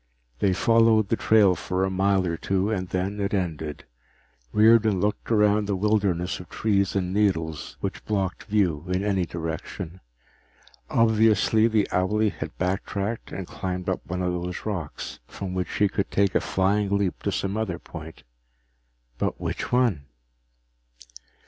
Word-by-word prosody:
They 100 Hz, -, +3 dB
followed 110 Hz, +1 st, +4 dB
the -, -, +3 dB
trail 105 Hz, -4 st, +4 dB
for 90 Hz, +2 st, -2 dB
a 95 Hz, -, 0 dB
mile 95 Hz, 0 st, +2 dB
or 85 Hz, -1 st, -1 dB
two 95 Hz, +4 st, 0 dB
and 95 Hz, -4 st, -2 dB
then 95 Hz, +3 st, -2 dB
it 100 Hz, 0 st, 0 dB
ended. 80 Hz, -5 st, -3 dB, 0.7 s
Riordan 110 Hz, -2 st, +5 dB
looked 105 Hz, +2 st, -1 dB
around 105 Hz, -2 st, +3 dB
the 100 Hz, -, 0 dB
wilderness 95 Hz, -3 st, 0 dB
of 90 Hz, -1 st, -11 dB
trees 100 Hz, -3 st, 0 dB
and 90 Hz, -1 st, -1 dB
needles 85 Hz, -7 st, 0 dB
which -, -, -4 dB
blocked 95 Hz, -4 st, -2 dB
view 95 Hz, -8 st, +1 dB
in 90 Hz, +1 st, 0 dB
any 95 Hz, -4 st, 0 dB
direction. 85 Hz, +2 st, -5 dB, 0.9 s
Obviously 110 Hz, 0 st, +4 dB
the 110 Hz, -3 st, +2 dB
owlie 105 Hz, +3 st, +2 dB
had -, -, -7 dB
backtracked 100 Hz, +4 st, -2 dB
and 95 Hz, -, -5 dB
climbed 90 Hz, +1 st, -4 dB
up 95 Hz, -, -1 dB
one 90 Hz, +1 st, -2 dB
of 90 Hz, 0 st, 0 dB
those 90 Hz, 0 st, -4 dB
rocks, 90 Hz, -9 st, -5 dB
from 95 Hz, -2 st, -6 dB
which 90 Hz, -1 st, -2 dB
he 105 Hz, -, +3 dB
could 95 Hz, 0 st, -2 dB
take 100 Hz, -1 st, +2 dB
a -, -, +2 dB
flying 100 Hz, +2 st, +1 dB
leap 100 Hz, -3 st, -1 dB
to -, -, -1 dB
some 100 Hz, +1 st, -2 dB
other 110 Hz, -6 st, -2 dB
point. 80 Hz, -1 st, -10 dB, 1.0 s
But -, -, -1 dB
which -, -, -4 dB
one? 120 Hz, -, +2 dB
95 Hz, 155 wpm, -25 LUFS, 90-105 Hz, 1.0 s, Riordan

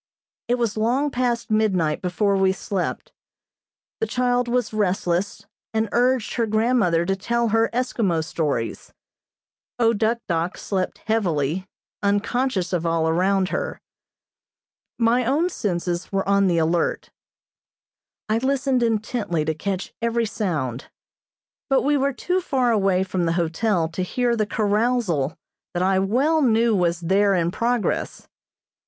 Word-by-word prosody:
It 240 Hz, -, +2 dB
was 235 Hz, -3 st, -1 dB
long 255 Hz, +7 st, +1 dB
past 245 Hz, -2 st, -1 dB
midnight 185 Hz, -8 st, +1 dB
before 200 Hz, +2 st, +1 dB
we 190 Hz, -1 st, +3 dB
slept. 190 Hz, -1 st, -4 dB, 0.9 s
The 450 Hz, -, 0 dB
child 245 Hz, 0 st, +1 dB
was 240 Hz, -2 st, 0 dB
restless, 195 Hz, -1 st, -1 dB, 0.3 s
and 220 Hz, -1 st, +1 dB
urged 245 Hz, -1 st, +1 dB
her 230 Hz, -2 st, 0 dB
grandmother 215 Hz, -6 st, +2 dB
to 195 Hz, +2 st, 0 dB
tell 235 Hz, +4 st, 0 dB
her 225 Hz, +1 st, +2 dB
Eskimo 225 Hz, -9 st, 0 dB
stories. 145 Hz, -9 st, -3 dB, 0.9 s
O 230 Hz, -1 st, +3 dB
Duk 225 Hz, +2 st, +1 dB
Dok 170 Hz, +1 st, -1 dB
slept 190 Hz, -2 st, -3 dB
heavily, 185 Hz, -5 st, 0 dB, 0.3 s
unconscious 205 Hz, -1 st, 0 dB
of 175 Hz, -2 st, 0 dB
all 165 Hz, -1 st, +1 dB
around 185 Hz, +3 st, +2 dB
her. -, -, -3 dB, 1.2 s
My 235 Hz, +1 st, +3 dB
own 290 Hz, +9 st, +1 dB
senses 175 Hz, -, -2 dB
were 195 Hz, -1 st, -1 dB
on 200 Hz, 0 st, +3 dB
the 175 Hz, -2 st, +2 dB
alert. 165 Hz, +1 st, 0 dB, 1.2 s
I 215 Hz, +1 st, +1 dB
listened 265 Hz, 0 st, +1 dB
intently 215 Hz, -7 st, -1 dB
to 160 Hz, -, 0 dB
catch 190 Hz, +4 st, -4 dB
every 235 Hz, 0 st, +1 dB
sound, 155 Hz, -, -3 dB, 0.8 s
but 270 Hz, -, +3 dB
we 290 Hz, +1 st, +2 dB
were 280 Hz, 0 st, +1 dB
too 360 Hz, +7 st, -1 dB
far 260 Hz, -8 st, +1 dB
away 195 Hz, -4 st, +2 dB
from 185 Hz, -2 st, -1 dB
the 165 Hz, -, +1 dB
hotel 170 Hz, +1 st, 0 dB
to 165 Hz, +3 st, -4 dB
hear 240 Hz, +6 st, 0 dB
the 215 Hz, -2 st, 0 dB
carousal 210 Hz, -, 0 dB, 0.4 s
that 175 Hz, -, +1 dB
I 190 Hz, 0 st, +3 dB
well 265 Hz, +12 st, +2 dB
knew 230 Hz, -3 st, +3 dB
was 175 Hz, -2 st, +1 dB
there 195 Hz, +3 st, +3 dB
in 170 Hz, -1 st, +1 dB
progress. 235 Hz, +2 st, -1 dB
205 Hz, 135 wpm, -23 LUFS, 180-235 Hz, 1.2 s, we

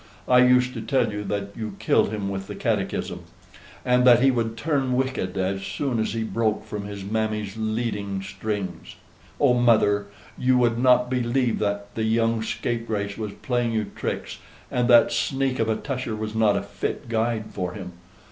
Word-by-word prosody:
I 125 Hz, 0 st, +6 dB
used 125 Hz, 0 st, +4 dB
to -, -, -5 dB
tell 135 Hz, -6 st, +1 dB
you 105 Hz, 0 st, -3 dB
that 100 Hz, -1 st, -2 dB
you 110 Hz, -3 st, -5 dB
killed -, -, +2 dB
him 105 Hz, -2 st, -3 dB
with 95 Hz, -1 st, -4 dB
the -, -, -6 dB
catechism, -, -, -2 dB, 0.6 s
and 125 Hz, 0 st, +4 dB
that 120 Hz, -2 st, +7 dB
he 135 Hz, +2 st, +5 dB
would 115 Hz, -2 st, -1 dB
turn 135 Hz, -1 st, 0 dB
wicked 130 Hz, -8 st, -1 dB
as 95 Hz, +1 st, -1 dB
soon 130 Hz, +3 st, -2 dB
as 110 Hz, -2 st, -1 dB
he 115 Hz, -1 st, -1 dB
broke 110 Hz, -1 st, -1 dB
from 105 Hz, -1 st, -5 dB
his 100 Hz, -1 st, -7 dB
mammy's 105 Hz, -1 st, -2 dB
leading 110 Hz, -3 st, -2 dB
strings. 100 Hz, 0 st, -5 dB, 0.4 s
Oh, 140 Hz, -4 st, +5 dB
mother, 110 Hz, -4 st, +3 dB, 0.3 s
you 130 Hz, 0 st, +3 dB
would 120 Hz, -1 st, +2 dB
not 125 Hz, 0 st, +4 dB
believe 125 Hz, -1 st, +1 dB
that 100 Hz, 0 st, -2 dB
the 110 Hz, -, -3 dB
young 115 Hz, 0 st, +2 dB
scapegrace 110 Hz, -3 st, -2 dB
was 105 Hz, -2 st, -5 dB
playing 120 Hz, -2 st, 0 dB
you 110 Hz, -2 st, -1 dB
tricks, -, -, -4 dB, 0.3 s
and 125 Hz, -1 st, +1 dB
that 120 Hz, -1 st, +6 dB
sneak 135 Hz, -2 st, 0 dB
of 110 Hz, -1 st, +1 dB
a 110 Hz, -, +2 dB
Tusher 130 Hz, -4 st, -4 dB
was 110 Hz, 0 st, -4 dB
not 110 Hz, -2 st, +3 dB
a -, -, -2 dB
fit 100 Hz, +4 st, -4 dB
guide 115 Hz, -1 st, -1 dB
for 90 Hz, -2 st, -3 dB
him. 95 Hz, -3 st, -7 dB
110 Hz, 180 wpm, -24 LUFS, 105-125 Hz, 0.6 s, that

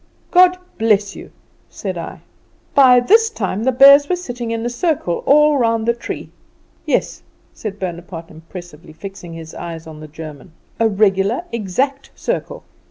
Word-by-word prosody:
"'God 365 Hz, 0 st, +6 dB, 0.2 s
bless 210 Hz, -3 st, +2 dB
you,' -, -, -10 dB, 0.4 s
said -, -, -5 dB
I. -, -, -7 dB, 0.5 s
"By 255 Hz, -3 st, +7 dB
this 445 Hz, -, +4 dB
time 210 Hz, -, -3 dB
the 260 Hz, -, +3 dB
bears 280 Hz, +3 st, +7 dB
were 365 Hz, -, +2 dB
sitting 245 Hz, -9 st, -6 dB
in 230 Hz, 0 st, -3 dB
a -, -, 0 dB
circle 245 Hz, -, -1 dB
all 300 Hz, +1 st, +5 dB
around 230 Hz, -4 st, +1 dB
the 235 Hz, -, +3 dB
tree. 235 Hz, -, -7 dB, 0.6 s
Yes," -, -, 0 dB, 0.3 s
said 205 Hz, -2 st, -6 dB
Bonaparte 170 Hz, -2 st, -6 dB
impressively, 165 Hz, 0 st, -12 dB
fixing 180 Hz, 0 st, -9 dB
his 165 Hz, -1 st, -9 dB
eyes 165 Hz, -2 st, -7 dB
on 155 Hz, -1 st, -10 dB
the 155 Hz, -, -9 dB
German, 155 Hz, +1 st, -10 dB, 0.3 s
"a 225 Hz, -, +4 dB
regular, 200 Hz, -, +1 dB
exact, 255 Hz, +6 st, -2 dB
circle. -, -, -4 dB
215 Hz, 155 wpm, -18 LUFS, 175-260 Hz, 0.6 s, By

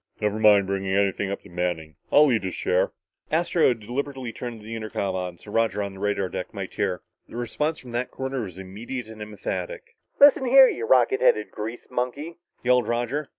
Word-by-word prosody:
"Never 105 Hz, 0 st, 0 dB
mind 105 Hz, -2 st, +6 dB
bringing 95 Hz, 0 st, -1 dB
anything 100 Hz, 0 st, +1 dB
up 100 Hz, -, -4 dB
to -, -, -15 dB
Manning. 85 Hz, -3 st, -3 dB, 0.2 s
I'll 150 Hz, -1 st, +6 dB
eat 110 Hz, -4 st, +1 dB
his 95 Hz, -, -3 dB
share." 90 Hz, 0 st, +1 dB, 0.4 s
Astro 170 Hz, +1 st, +3 dB
had 120 Hz, -3 st, 0 dB
deliberately 130 Hz, +1 st, -4 dB
turned 120 Hz, -2 st, -6 dB
the 110 Hz, +2 st, -7 dB
intercom 105 Hz, -3 st, -3 dB
on 90 Hz, -2 st, -4 dB
so 105 Hz, -, -13 dB
Roger 110 Hz, -2 st, +1 dB
on 100 Hz, -1 st, -5 dB
the 95 Hz, -, -11 dB
radar 105 Hz, -1 st, 0 dB
deck -, -, -6 dB
might -, -, -5 dB
hear. -, -, -1 dB, 0.3 s
The -, -, -11 dB
response 150 Hz, +7 st, -2 dB
from 125 Hz, -4 st, -11 dB
that 120 Hz, +2 st, -2 dB
corner 130 Hz, -1 st, -4 dB
was 95 Hz, -5 st, -7 dB
immediate 110 Hz, +7 st, -6 dB
and 110 Hz, -1 st, -11 dB
emphatic. 450 Hz, -, -5 dB, 0.2 s
"Listen, 280 Hz, -2 st, +7 dB
you 270 Hz, -, +6 dB
rocket 405 Hz, -3 st, +4 dB
headed -, -, +3 dB
grease 110 Hz, +3 st, -6 dB
monkey," 125 Hz, +7 st, -3 dB, 0.3 s
yelled 125 Hz, -2 st, +3 dB
Roger. 120 Hz, +5 st, -1 dB
115 Hz, 195 wpm, -25 LUFS, 100-135 Hz, 0.4 s, Listen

